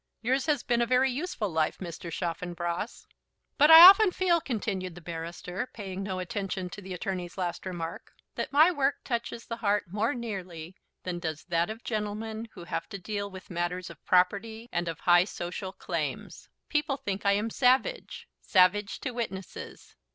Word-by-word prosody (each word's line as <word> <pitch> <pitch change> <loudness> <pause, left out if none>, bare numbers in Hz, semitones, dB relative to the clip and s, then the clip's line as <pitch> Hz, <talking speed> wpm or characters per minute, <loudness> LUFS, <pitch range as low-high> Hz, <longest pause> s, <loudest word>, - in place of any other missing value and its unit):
"Yours 260 +5 +1
has 295 -5 +1
been 240 -1 +1
a - - +3
very 255 +2 +3
useful 275 - -3
life, 160 -3 0
Mr. 170 -1 -7
Chaffanbrass." 175 +3 -4 0.5
"But 295 +2 +7
I 325 +2 +13
often 400 +2 +8
feel," 350 -2 +2
continued 195 - -3
the - - -9
barrister, 170 +6 -5
paying 195 -3 -5
no 195 -1 -3
attention 185 -1 -4
to 205 - -8
the 190 -1 -6
attorney's 180 0 -4
last 180 0 -3
remark, 170 -2 -6 0.2
"that - - -4
my 310 +5 +6
work 280 -4 0
touches 235 -1 -3
the 230 - -5
heart 210 -2 +1
more 215 +5 0
nearly 185 -7 -6 0.3
than 180 -1 -3
does 160 -3 -4
that 170 +1 +1
of 220 +2 -7
gentlemen 220 +1 -3
who - - -10
have 170 - -4
to 200 - -6
deal 200 +1 -4
with 190 0 -11
matters 175 +1 -3
of - - -16
property 210 +5 +1
and 175 0 -1
of 165 -2 -5
high 175 0 +5
social 185 0 -5
claims. - - -5 0.2
People 300 -2 0
think 200 -5 -4
I 200 - +4
am 210 +3 -1
savage, 265 - +1
savage 195 +2 +3
to 260 - -3
witnesses." 205 -6 -7
200 Hz, 175 wpm, -28 LUFS, 180-235 Hz, 0.5 s, I